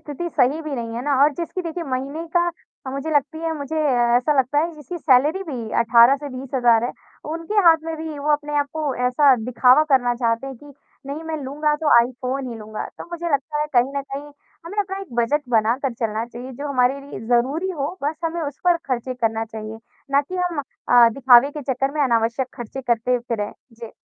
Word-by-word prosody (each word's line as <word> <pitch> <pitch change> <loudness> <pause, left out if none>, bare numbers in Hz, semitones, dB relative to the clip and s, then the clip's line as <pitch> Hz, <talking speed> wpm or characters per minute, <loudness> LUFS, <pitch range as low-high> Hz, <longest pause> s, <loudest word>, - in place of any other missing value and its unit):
स्थिति 315 +3 -5
सही 275 +3 +3
भी 305 -2 -4
नहीं 230 -2 -5
है 240 - -3
ना 290 -1 +1
और 295 +1 +5
जिसकी 345 +3 -4
देखिए 335 0 -4
महीने 275 +4 -4
का 345 0 +3 0.4
अ, - - -3
मुझे 275 +4 -4
लगती 300 +2 0
है 325 - 0
मुझे 285 +3 -5 0.4
ऐसा 275 +3 +1
लगता 265 +3 +2
है 325 +3 +1
जिसकी 310 +4 -8
सैलरी 300 +5 +3
भी 250 - -6
18 235 +3 +6
से 290 +1 -7
20,000 245 -3 +2
है 245 - -2 0.4
उनके 330 +6 -5
हाथ 330 -1 +8
में 325 0 -4
भी 315 -2 -6
वो 295 +1 +1
अपने 295 0 -1
आप 285 - +1
को 305 -4 -2
ऐसा 265 +2 +5
दिखावा 250 +4 +5
करना 245 -2 +3
चाहते 235 +1 -1
हैं 270 -1 -7
कि 290 +4 -15 0.3
नहीं 285 +3 -5
मैं 320 -1 -3
लूँगा 300 +3 0
तो 310 - +2
आईफ़ोन 255 +2 -3
ही - - -6
लूँगा 215 0 -6
तो - - -7
मुझे 345 0 -4
लगता 280 +2 -1
है 300 - 0
कहीं 250 +2 +3
न 280 - -1
कहीं 285 +2 -6 0.4
हमें 405 +5 -7
अपना 385 -1 -1
एक 390 -9 -10
बजट 265 +6 +2
बनाकर 235 +3 +1
चलना 225 -1 -2
चाहिए 245 +2 -9
जो 285 +4 -6
हमारे 265 0 +1
लिए 275 -6 -9
ज़रूरी 270 +10 +1
हो 295 -5 -2
बस 295 +2 0
हमें 330 +1 -2
उस 285 -2 -5
पर 350 -1 +5
ख़र्चे 255 +1 -2
करना 225 -2 -1
चाहिए 220 0 -8 0.3
ना 280 0 +4
कि 290 +6 -9
हम 355 -3 -1 0.3
अ, 240 -1 +7
दिखावे 265 0 +6
के 295 0 -7
चक्कर 270 +2 -1
में 305 - -1
अनावश्यक 235 0 +1
ख़र्चे 240 +1 -6
करते 245 0 +1
फिरें। 230 -4 -3 0.2
जी। 230 -1 -10
275 Hz, 215 wpm, -22 LUFS, 245-305 Hz, 0.4 s, हाथ